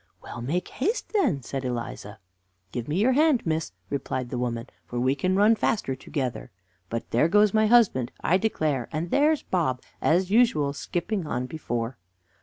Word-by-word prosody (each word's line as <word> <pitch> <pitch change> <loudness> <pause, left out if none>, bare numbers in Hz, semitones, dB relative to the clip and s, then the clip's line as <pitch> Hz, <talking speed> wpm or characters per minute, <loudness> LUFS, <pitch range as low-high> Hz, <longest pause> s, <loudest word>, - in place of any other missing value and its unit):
"Well, 120 - -7
make 155 +9 -2
haste, 420 - -2
then," 240 - +1
said 135 +2 -4
Eliza. 120 -4 -5 0.5
"Give 120 0 -4
me 150 +3 -1
your 225 +6 +4
hand, 295 -1 +3
miss," 160 -1 -1 0.2
replied 130 -3 -3
the 125 - -2
woman; 120 -1 -2 0.2
"for 120 - -5
we 130 +2 +2
can 185 +7 0
run 210 +3 +5
faster 210 -10 0
together. 130 -4 -4 0.4
But 115 0 -4
there 120 +7 +4
goes 210 +3 +4
my 215 0 +4
husband, 210 - +4
I 180 - +3
declare; 155 - -1
and 165 +2 -3
there's 300 +1 +3
Bob, 140 -9 -1 0.2
as 180 +4 +2
usual, 180 -12 +3
skipping 175 +4 -3
on 125 -2 -2
before." 120 -4 -4
155 Hz, 170 wpm, -26 LUFS, 125-210 Hz, 0.5 s, run